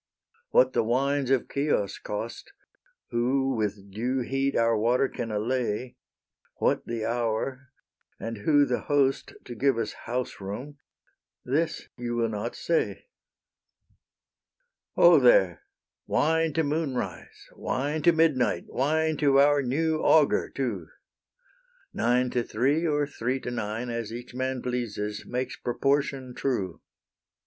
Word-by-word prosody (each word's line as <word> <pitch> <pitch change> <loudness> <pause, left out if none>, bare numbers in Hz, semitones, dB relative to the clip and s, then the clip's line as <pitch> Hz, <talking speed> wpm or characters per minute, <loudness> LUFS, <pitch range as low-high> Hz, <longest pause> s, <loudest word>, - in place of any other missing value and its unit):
What - - +4
the - - +3
wines 135 +4 0
of 135 -2 +2
Chios 140 -8 0
cost, 115 - -6 0.6
Who 130 +3 +1
with 100 -2 -3
due 125 +6 -1
heat 135 +2 -1
our 115 0 +3
water 120 +5 +2
can 120 -3 -5
allay, 120 +2 -2 0.6
What - - 0
the 115 -2 -3
hour, 120 +3 -2 0.5
and 115 0 -5
who 145 +5 +4
the 125 -2 -1
host 140 -2 +1
To 120 - -7
give 130 +1 +1
us 115 -2 -2
house 125 -2 -3
room, 125 +10 -6 0.7
this 155 +6 -1
you 120 -1 -3
will 115 -1 +1
not 110 +2 -4
say. 170 - -1 1.9
Ho, - - +7
there! - - +4 0.5
wine 160 +1 +2
to 160 - +1
moonrise, 145 -4 -3
wine 145 +4 -2
To 170 - +6
midnight, 140 - +2
wine 155 +3 +1
to 140 -2 +4
our 145 0 +5
new 155 +5 0
augur 155 -3 +4
too! 110 - -3 1.1
Nine 125 +1 +1
to 125 - +1
three 140 +9 +1
or 145 -1 +1
three 130 -2 -2
to 125 - -4
nine, 115 +1 -3
As 115 -2 -4
each 120 +2 -8
man 130 0 -2
pleases, 110 -4 -3
makes 125 +1 -3
proportion 135 +1 0
true. 110 -11 -2
125 Hz, 130 wpm, -27 LUFS, 115-140 Hz, 1.9 s, Ho